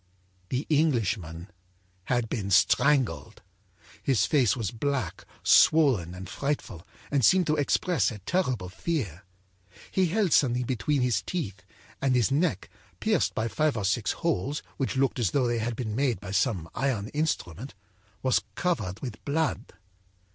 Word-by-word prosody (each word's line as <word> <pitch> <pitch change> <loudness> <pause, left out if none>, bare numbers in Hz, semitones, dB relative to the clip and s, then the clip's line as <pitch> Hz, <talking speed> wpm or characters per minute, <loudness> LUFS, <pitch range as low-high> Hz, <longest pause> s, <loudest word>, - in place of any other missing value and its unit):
âThe 130 +4 -2
Englishman 110 - 0 0.6
had 120 -2 0
been 105 -3 -3
strangled! 125 - +2 0.6
His 130 -5 +2
face 130 -9 +3
was 110 -6 -2
black, 130 - -3 0.2
swollen 125 - +4
and 95 +1 -8
frightful, 110 - -4 0.2
and 140 -3 +2
seemed 185 - +5
to 155 -1 +1
express 160 +4 +1
a 110 - -7
terrible 125 - -1
fear. 95 - -3 0.7
He 190 -1 +2
held 195 0 +1
something 125 -2 +3
between 130 +3 0
his 120 -6 +1
teeth, 100 - -4 0.4
and 135 -2 +2
his 125 +1 +2
neck, 145 - 0 0.3
pierced - - +1
by 110 - 0
five 145 +5 0
or 105 - -2
six 100 +1 +1
holes 150 -3 -2
which 135 - -2
looked 135 -1 +1
as 115 -6 +2
though 130 +6 +1
they 120 -1 0
had 115 +1 -2
been 110 -3 -4
made 130 -5 +1
by 100 -1 -8
some 100 -4 0
iron 120 -6 -1
instrument, 135 - -3 0.5
was 130 -1 +3
covered 110 - -1
with 120 -5 -7
blood. 155 +2 -1
125 Hz, 145 wpm, -27 LUFS, 100-145 Hz, 0.7 s, seemed